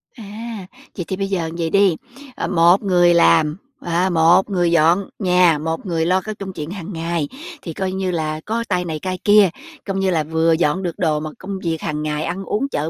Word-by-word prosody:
À, 220 -2 -8 0.3
vậy 175 - -3
thì 190 - -2
bây 195 +1 -2
giờ 175 -5 -2
vậy 165 -1 -1
đi, 195 -1 +3 0.4
ờ, - - -3
một 175 +2 +4
người 175 -3 +4
làm, 150 - +4 0.2
ờ, 175 +2 0
một 175 +3 +4
người 175 -3 +1
dọn 170 +4 +3
nhà, 180 -4 +4
một 160 +5 -4
người 165 -3 -1
lo 185 +2 +2
cái 215 +2 -6
công 195 -2 -7
chuyện 155 -1 -6
hàng 190 -1 -7
ngày, 165 -2 -2 0.3
thì 165 - -6
coi 190 +2 -2
như 190 -1 -2
là 155 -2 -2
có 230 +2 -1
tay 180 -2 0
này, 155 -2 -4
tay 185 -1 -3
kia, 205 -2 +6 0.4
coi 195 - -2
như 195 -1 +1
là 160 -4 +1
vừa 160 +1 +1
dọn 160 +2 +1
được 175 -2 -4
đồ 155 -4 +1
mà 155 0 -5
công 195 0 -6
việc 165 -2 -2
hàng 150 -1 -3
ngày 150 0 -2
ăn 185 +3 -4
uống, 260 +9 -2
chợ 155 - -2
175 Hz, 225 wpm, -20 LUFS, 160-190 Hz, 0.4 s, kia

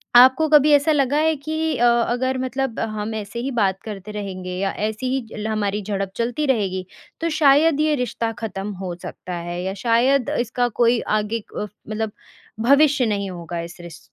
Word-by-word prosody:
आपको 260 +5 +7
कभी 300 0 +6
ऐसा 290 +2 +4
लगा 285 -1 +2
है 315 +1 +3
कि 315 +2 -2
अ, 240 - +3
अगर 240 +2 +1
मतलब 260 -1 -2
हम 215 0 -3
ऐसे 215 +2 -5
ही 265 +3 -2
बात 195 -5 +1
करते 210 -1 -7
रहेंगे। 190 -3 -5
या 195 +1 0
ऐसे 215 +3 -3
ही 255 -1 -1
ल 215 0 -3
हमारी 210 -1 -1
झड़प 195 -1 -3
चलती 245 +6 -1
रहेगी 195 -8 0 0.4
तो 335 - 0
शायद 300 0 +4
ये 305 0 +3
रिश्ता 235 -3 -2
ख़त्म 205 -2 -4
हो 180 -2 -3
सकता 180 - -7
है? 175 0 -4
या 190 +1 -2
शायद 240 +5 +2
इसका 245 +1 0
कोई 235 0 +4 0.2
आगे 215 +2 -2 0.2
अ, - - -1 0.3
मतलब 215 0 -2 0.5
भविष्य 280 +2 +4
नहीं 200 -3 -1
होगा। 170 -1 -6
इस 170 +1 -9
रिश 170 -1 -10
230 Hz, 185 wpm, -22 LUFS, 200-270 Hz, 0.5 s, आपको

